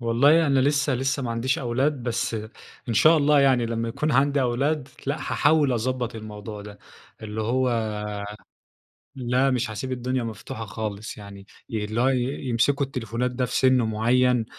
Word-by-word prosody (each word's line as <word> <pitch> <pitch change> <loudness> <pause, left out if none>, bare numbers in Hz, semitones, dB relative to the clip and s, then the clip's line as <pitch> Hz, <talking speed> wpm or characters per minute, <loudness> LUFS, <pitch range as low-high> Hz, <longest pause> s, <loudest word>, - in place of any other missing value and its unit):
والله 140 +8 +4
أنا 135 -2 +3
لسه 140 0 +2
لسه 135 +3 -1
ما 120 - -3
عنديش 115 +3 0
أولاد، 130 +3 0
بس 120 -1 -2 0.5
إن 115 - -1
شاء 160 +10 +6
الله 145 -1 +4
يعني 130 -4 +3
لمّا 115 0 -2
يكون 150 +6 -1
عندي 140 +2 +3
أولاد 135 +3 0 0.2
لأ، 140 +2 0
حاحاول 145 -3 +2
اضبط 125 0 -2
الموضوع 105 -1 -8
ده، 105 0 -11 0.4
اللي 110 0 -5
هو 115 -2 0 1.2
لأ 130 +1 +1
مش 125 -2 0
هاسيب 130 +4 -5
الدنيا 125 0 -2
مفتوحة 115 0 -6
خالص 105 +1 -5
يعني، 100 -1 -11 0.3
اللي 110 +1 -2
هو 130 - +4
ي 130 -2 +1 0.3
يمسكوا 140 +4 +2
التليفونات 125 -2 -3
ده 125 0 -1
في 125 - -5
سِن 130 -1 +4
معيّن، 120 +2 +2
125 Hz, 160 wpm, -24 LUFS, 115-135 Hz, 1.2 s, شاء